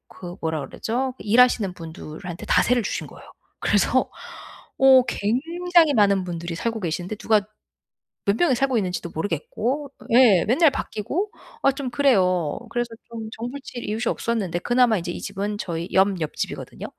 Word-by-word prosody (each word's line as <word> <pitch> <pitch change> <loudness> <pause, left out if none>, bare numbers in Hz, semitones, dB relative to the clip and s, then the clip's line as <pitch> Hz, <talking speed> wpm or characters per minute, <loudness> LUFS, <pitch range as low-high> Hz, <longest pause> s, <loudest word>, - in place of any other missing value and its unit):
그 175 -1 -8
뭐라 160 -2 -1
그러죠? 255 +3 -3
일하시는 220 -3 +3
분들한테 165 +1 -8
다 - - +4
세를 245 -1 +2
주신 - - -3
거예요. - - -14 0.3
그래서 - - +2 0.7
어 265 -1 +7
굉장히 330 - +2
많은 200 -3 +4
분들이 170 -1 -5
살고 225 +4 -2
계시는데 175 +4 -3
누가 215 -2 +2 0.8
몇 200 +1 +3
명이 300 -8 +3
살고 265 0 +1
있는지도 180 -4 -2
모르겠고 215 - -2 0.2
예 230 -8 +6
맨날 285 +8 +5
바뀌고 335 - -3 0.3
아 275 - +5
좀 270 -1 -5
그래요. 185 - +2
그래서 240 +1 -2 0.2
좀 225 -2 -7
정 235 +2 -5
붙일 265 -5 -7
이웃이 220 +3 -2
없었는데 200 -7 -1
그나마 240 +1 +3
이제 175 0 -4
이 - - -6
집은 200 +1 -3
저희 170 -3 -4
옆 190 -1 +3
옆집이거든요. 155 - -5
220 Hz, 345 characters per minute, -23 LUFS, 180-250 Hz, 0.8 s, 어